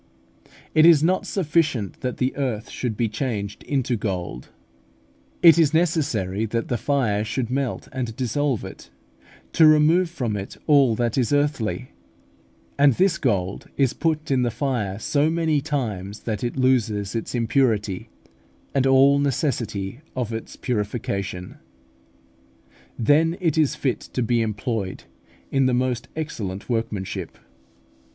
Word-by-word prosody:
It 155 - +5
is 160 -3 +7
not 185 +3 +1
sufficient 150 - 0
that 125 -1 -3
the 130 +1 0
earth 125 -6 -3
should 115 -4 -3
be 115 - +1
changed 105 -3 -4
into 130 -3 -1
gold; 90 - -4 0.9
it 170 -1 +8
is 160 -1 +3
necessary 130 - 0
that 115 +1 -2
the 120 - 0
fire 120 -8 +1
should 120 +2 -3
melt 135 -2 -2
and 120 -4 -4
dissolve 130 0 -1
it, - - -11 0.6
to 160 - +6
remove 155 +4 +5
from 125 -10 -3
it 100 -1 -6
all 140 -6 +5
that 120 +2 0
is 120 - 0
earthly; 145 -4 0 0.9
and 140 -2 +6
this 180 +4 +2
gold 100 -7 -1
is 135 -3 +2
put 155 -2 -1
in 130 -2 +3
the 120 - +1
fire 115 -5 -2
so 145 +7 +1
many 160 -3 +1
times 110 -9 -3
that 110 -1 -3
it 120 +2 -3
loses 110 -6 +1
its 115 +2 -3
impurity, 115 -5 0 0.6
and 135 -1 +2
all 135 +1 +5
necessity 120 -7 -1 0.2
of 120 -3 -2 0.3
purification. 100 -5 -3 1.4
Then 160 +8 +3
it 165 -5 +1
is 155 -3 +2
fit 130 -4 -1
to 125 - 0
be 115 0 +1
employed 105 -2 -3 0.5
in 135 -1 +3
the 125 - +2
most 125 -1 -1
excellent 110 - -5
workmanship. 110 -5 -3
125 Hz, 135 wpm, -23 LUFS, 110-145 Hz, 1.4 s, it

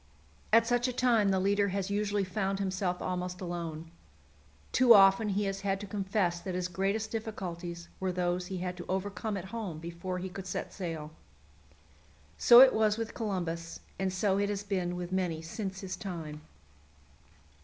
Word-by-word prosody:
At 230 +1 +6
such 245 +1 +2
a 255 - -2
time 235 -5 +3
the 190 -1 +2
leader 200 +1 +2
has 195 0 -2
usually 205 0 0
found 195 +1 -1
himself 185 -2 -2
almost 180 0 -3
alone; 165 -3 -5 0.8
too 245 -2 +7
often 195 +2 +6
he 200 +1 0
has 195 -1 -2
had 195 -1 0
to 205 - -6
confess 195 -3 -1
that 185 +1 -5
his 180 -1 -1
greatest 195 +4 -1
difficulties 175 -6 -5
were 190 -1 -1
those 180 0 -1
he 190 - -4
had 180 0 -3
to 175 - -7
overcome 200 +2 -2
at 185 - -6
home 205 -9 -4
before 170 +3 -5
he 185 +1 -4
could 190 0 -8
set 180 - -4
sail. 165 -5 -5 1.3
So 240 +1 +9
it 265 -1 +8
was 215 -1 +2
with 225 -1 -4
Columbus, 170 -6 -3 0.2
and 190 -1 0
so 190 +1 +1
it 200 0 +1
has 205 -1 -2
been 185 -3 -2
with 180 0 -5
many 180 -4 0
since 190 +3 -5
his 190 -1 -4
time. 160 -6 -6
190 Hz, 175 wpm, -31 LUFS, 180-205 Hz, 1.3 s, So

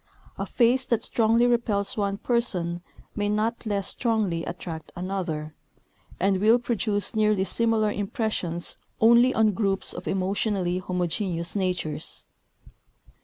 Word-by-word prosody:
A - - -4
face 250 +2 +2
that 235 -3 +1
strongly 230 +1 +3
repels 230 -5 +1
one 200 -2 -1
person 180 -8 0 0.3
may 205 -1 0
not 220 +2 -1
less 200 -2 0
strongly 215 -8 0
attract 165 -2 -7
another, 175 -5 -3 0.7
and 190 0 +2
will 220 +3 +6
produce 220 -4 0
nearly 215 -3 +2
similar 220 0 +1
impressions 200 -5 -2 0.2
only 235 +3 +6
on 220 -3 +3
groups 195 -1 -1
of - - -8
emotionally 190 -1 0
homogeneous 180 -1 -2
natures. 180 -6 -2
205 Hz, 120 wpm, -26 LUFS, 180-225 Hz, 0.7 s, will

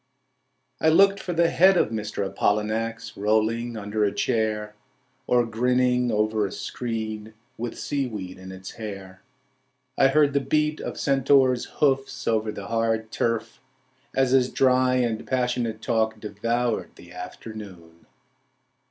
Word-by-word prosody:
I 160 - +5
looked 195 +4 +5
for 180 - -4
the 170 0 +2
head 190 +2 +5
of 115 - +2
Mr. 105 -2 -3
Apollinax 110 +3 -1
rolling 110 +3 0
under 105 +1 -2
a 100 - +2
chair 110 -3 -1 0.5
Or 120 -1 +3
grinning 125 +1 +1
over 110 -1 +1
a - - -9
screen 110 -2 -5 0.2
With 120 0 -5
seaweed 110 -10 -4
in 95 0 -9
its 95 0 -9
hair. 95 -4 -8 0.8
I 135 - +7
heard 145 +1 +3
the 140 - +3
beat 150 +3 0
of - - -5
centaur's 135 -2 +3
hoofs 135 -2 0
over 110 -1 +1
the 100 -2 -7
hard 115 0 -1
turf 115 -1 -2 0.5
As 130 -1 +2
his 130 -1 +4
dry 130 -1 +3
and 120 -3 -1
passionate 125 -3 -1
talk 110 -1 0
devoured 115 +3 -2
the - - -15
afternoon. 95 -7 -10
115 Hz, 135 wpm, -25 LUFS, 105-130 Hz, 0.8 s, I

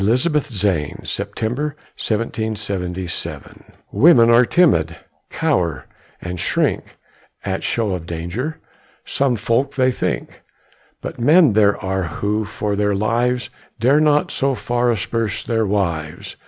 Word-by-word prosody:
BETTY 130 +9 +2 0.2
ZANE 90 -7 -1
[September, 140 +7 -3 0.2
1777] 100 -5 -4 0.3
Women 125 -7 +6
are 120 +1 +5
timid, 85 - +3 0.3
cower 80 -7 0 0.3
and 90 0 -6
shrink - - -1 0.5
At - - -2
show 115 -4 0
of 90 -3 -4
danger, 90 - -4 0.5
some 135 -3 +1
folk 115 +6 0
think; 130 -1 -1 0.6
But - - -7
men 150 - +5
there 105 -1 +4
are 95 -1 -2
who 105 +6 -2
for 105 0 -3
their 105 0 +1
lives 120 +4 0 0.3
Dare 130 +6 +4
not 150 -1 +3
so 135 0 0
far 120 +3 0
asperse 110 0 -1
their 115 -2 0
wives. 85 -6 -2
110 Hz, 115 wpm, -20 LUFS, 95-125 Hz, 0.6 s, Women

